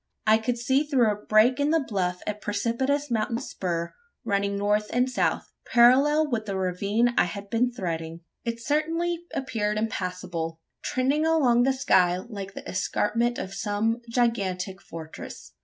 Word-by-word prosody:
I 220 Hz, 0 st, +5 dB
could 240 Hz, +2 st, -1 dB
see 260 Hz, +4 st, +2 dB
through 260 Hz, -7 st, +3 dB
a -, -, -1 dB
break 225 Hz, +5 st, +4 dB
in 285 Hz, +1 st, +2 dB
the 325 Hz, +1 st, +3 dB
bluff 180 Hz, -4 st, -2 dB
a 210 Hz, -, -1 dB
precipitous 235 Hz, +7 st, -1 dB
mountain 230 Hz, 0 st, 0 dB
spur 170 Hz, -7 st, -3 dB, 0.3 s
running 200 Hz, -2 st, 0 dB
north 210 Hz, +1 st, +1 dB
and 250 Hz, +1 st, +2 dB
south 255 Hz, -, -1 dB, 0.2 s
parallel 275 Hz, +6 st, +5 dB
with 220 Hz, -2 st, -1 dB
the 195 Hz, -1 st, -2 dB
ravine 200 Hz, +6 st, +1 dB
I -, -, +5 dB
had 200 Hz, +3 st, -7 dB
been 245 Hz, +2 st, +2 dB
threading. 165 Hz, -6 st, -4 dB, 0.2 s
It 230 Hz, 0 st, -3 dB
certainly 330 Hz, +3 st, 0 dB
appeared 210 Hz, -5 st, -2 dB
impassable 180 Hz, -6 st, -3 dB, 0.2 s
trending 280 Hz, +5 st, +1 dB
along 265 Hz, -7 st, +4 dB
the 265 Hz, +2 st, +4 dB
sky 185 Hz, -10 st, +3 dB
like 195 Hz, -1 st, -7 dB
the -, -, -8 dB
escarpment 230 Hz, +5 st, 0 dB
of 190 Hz, -, -5 dB
some 225 Hz, +2 st, -1 dB
gigantic 195 Hz, -6 st, -1 dB
fortress. 160 Hz, -, -9 dB
220 Hz, 155 wpm, -26 LUFS, 195-250 Hz, 0.3 s, I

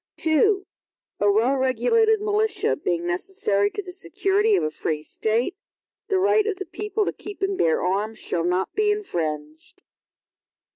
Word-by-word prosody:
II 380 Hz, +6 st, +3 dB, 0.6 s
A 205 Hz, 0 st, +4 dB
well 230 Hz, +6 st, +3 dB
regulated 265 Hz, -, +2 dB
militia, 425 Hz, 0 st, +1 dB
being 175 Hz, -, -2 dB
necessary 200 Hz, -, 0 dB
to 410 Hz, -, -5 dB
the 365 Hz, -, -8 dB
security 395 Hz, +3 st, +1 dB
of -, -, +1 dB
a 155 Hz, -, -1 dB
free 155 Hz, 0 st, -3 dB
State, 225 Hz, -, -1 dB, 0.5 s
the 390 Hz, -3 st, +1 dB
right 410 Hz, +3 st, +3 dB
of 425 Hz, -, 0 dB
the 385 Hz, 0 st, -6 dB
people 420 Hz, 0 st, -2 dB
to -, -, -2 dB
keep 405 Hz, -1 st, -8 dB
and 390 Hz, 0 st, +1 dB
bear 165 Hz, -, +1 dB
arms, 205 Hz, +4 st, -1 dB
shall 165 Hz, -, -1 dB
not 180 Hz, +2 st, 0 dB
be 425 Hz, 0 st, +2 dB
infringed. 155 Hz, -, -4 dB
360 Hz, 155 wpm, -24 LUFS, -, 0.6 s, A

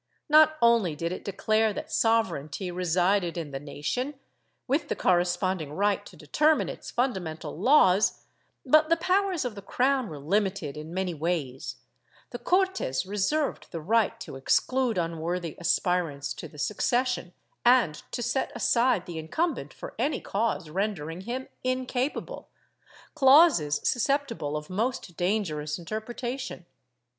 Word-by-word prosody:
Not 310 Hz, +1 st, +6 dB
only 230 Hz, -9 st, +4 dB
did 170 Hz, +3 st, -3 dB
it 185 Hz, -, -5 dB
declare 215 Hz, +2 st, +1 dB
that -, -, -7 dB
sovereignty 200 Hz, -6 st, 0 dB
resided 180 Hz, +1 st, +1 dB
in 160 Hz, -4 st, -4 dB
the 135 Hz, -, -4 dB
nation, 150 Hz, -, -3 dB, 0.5 s
with 280 Hz, +5 st, 0 dB
the -, -, 0 dB
corre 175 Hz, -2 st, +3 dB
sponding 175 Hz, -4 st, -2 dB
right 205 Hz, 0 st, +1 dB
to -, -, -14 dB
determine 300 Hz, -, +2 dB
its -, -, -8 dB
fundamental 190 Hz, -11 st, -2 dB
laws, 200 Hz, -, +4 dB, 0.4 s
but 310 Hz, +4 st, +5 dB
the 335 Hz, -, +4 dB
powers 370 Hz, -2 st, +1 dB
of 245 Hz, -, -3 dB
the 200 Hz, -, -9 dB
cro^^•n 255 Hz, +5 st, +1 dB
were 155 Hz, -, -7 dB
limited 185 Hz, -1 st, -1 dB
in 155 Hz, +1 st, -8 dB
many 185 Hz, 0 st, -2 dB
ways; 150 Hz, -5 st, -3 dB, 0.6 s
the 240 Hz, -, -6 dB
Cortes 365 Hz, -, +1 dB
reserved 210 Hz, +10 st, -1 dB
the 170 Hz, -, -5 dB
right 225 Hz, +6 st, +1 dB
to 230 Hz, -, -7 dB
exclude 250 Hz, -, +1 dB
unworthy 170 Hz, 0 st, -2 dB
aspirants 170 Hz, -5 st, 0 dB
to -, -, -8 dB
the 150 Hz, -, -16 dB
succession, 240 Hz, -, 0 dB, 0.3 s
and 240 Hz, -11 st, +4 dB
to 240 Hz, -, -3 dB
set 265 Hz, -, -1 dB
aside 240 Hz, -4 st, +2 dB
the 170 Hz, -2 st, -6 dB
incumbent 315 Hz, -, -2 dB
for -, -, -9 dB
any 295 Hz, -, 0 dB
cause 205 Hz, -4 st, -1 dB
rendering 180 Hz, -3 st, -3 dB
him 250 Hz, +6 st, -5 dB, 0.2 s
incapable 255 Hz, +1 st, -2 dB, 0.3 s
— -, -, -24 dB
clauses 265 Hz, -, +5 dB
susceptible 245 Hz, -, 0 dB
of 150 Hz, 0 st, -7 dB
most 215 Hz, -1 st, -2 dB
dangerous 165 Hz, -6 st, -1 dB
interpretation. 235 Hz, +3 st, -5 dB
200 Hz, 140 wpm, -27 LUFS, 165-255 Hz, 0.6 s, Not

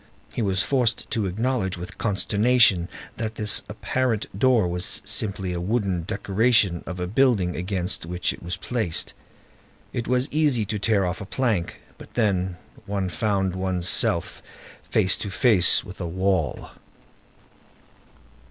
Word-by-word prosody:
He -, -, -3 dB
was 95 Hz, -3 st, +1 dB
forced 125 Hz, -5 st, 0 dB
to 110 Hz, -4 st, -1 dB
acknowledge 105 Hz, -1 st, -1 dB
with 90 Hz, -, -9 dB
consternation 105 Hz, -3 st, +2 dB, 0.3 s
that 110 Hz, -1 st, -4 dB
this 105 Hz, -1 st, +4 dB
apparent 115 Hz, +1 st, -1 dB
door 120 Hz, -2 st, +3 dB
was 90 Hz, +1 st, 0 dB
simply 95 Hz, -3 st, -1 dB
the 85 Hz, -, -3 dB
wooden 95 Hz, -4 st, -1 dB
decoration 100 Hz, -1 st, +2 dB
of 90 Hz, -1 st, -6 dB
a 90 Hz, -, -2 dB
building 100 Hz, -4 st, +1 dB
against 90 Hz, -2 st, -3 dB
which 90 Hz, +1 st, -1 dB
it -, -, -13 dB
was 85 Hz, +1 st, -4 dB
placed. 105 Hz, -3 st, -2 dB, 0.8 s
It 120 Hz, -, -3 dB
was 125 Hz, +1 st, +1 dB
easy 145 Hz, -7 st, +1 dB
to 105 Hz, +1 st, -3 dB
tear 100 Hz, -1 st, +2 dB
off 90 Hz, +2 st, -4 dB
a -, -, -6 dB
plank; 110 Hz, -8 st, -2 dB, 0.2 s
but -, -, -14 dB
then, 95 Hz, -5 st, 0 dB, 0.3 s
one 100 Hz, -2 st, -2 dB
found 95 Hz, -2 st, -1 dB
one's 95 Hz, -2 st, 0 dB
self -, -, +3 dB, 0.5 s
face 95 Hz, -, +4 dB
to 100 Hz, -, -5 dB
face 95 Hz, -2 st, +4 dB
with 95 Hz, -1 st, -10 dB
a 85 Hz, -, -3 dB
wall. 95 Hz, -2 st, -1 dB
100 Hz, 145 wpm, -24 LUFS, 90-115 Hz, 0.8 s, this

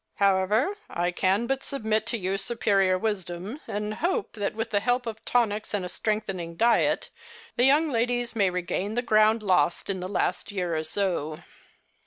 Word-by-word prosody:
However, 200 Hz, -, +2 dB
I 175 Hz, +1 st, -1 dB
can 190 Hz, +5 st, +1 dB
but 270 Hz, +2 st, -1 dB
submit 220 Hz, -4 st, -1 dB
to 230 Hz, -, -1 dB
your 190 Hz, -1 st, -1 dB
superior 195 Hz, -4 st, +2 dB
wisdom, 190 Hz, -, -3 dB
and 210 Hz, +1 st, -3 dB
hope 375 Hz, -, -1 dB
that 205 Hz, -2 st, -3 dB
with 225 Hz, +1 st, -3 dB
the 205 Hz, -, +3 dB
help 245 Hz, +3 st, 0 dB
of 220 Hz, -1 st, -6 dB
tonics 215 Hz, -3 st, 0 dB
and 195 Hz, -3 st, -2 dB
a -, -, -5 dB
strengthening 190 Hz, -6 st, -3 dB
diet 235 Hz, +5 st, +2 dB, 0.4 s
the 245 Hz, -, +4 dB
young 295 Hz, +4 st, +5 dB
ladies 240 Hz, 0 st, 0 dB
may 200 Hz, -4 st, +3 dB
regain 180 Hz, +3 st, -2 dB
the 245 Hz, -, 0 dB
ground 215 Hz, -1 st, +4 dB
lost 180 Hz, -1 st, +2 dB
in 190 Hz, -, -3 dB
the 180 Hz, +1 st, -5 dB
last 190 Hz, +1 st, -1 dB
year 180 Hz, -4 st, -2 dB
or 155 Hz, -, -1 dB
so." 160 Hz, -2 st, -2 dB
210 Hz, 175 wpm, -26 LUFS, 185-230 Hz, 0.4 s, young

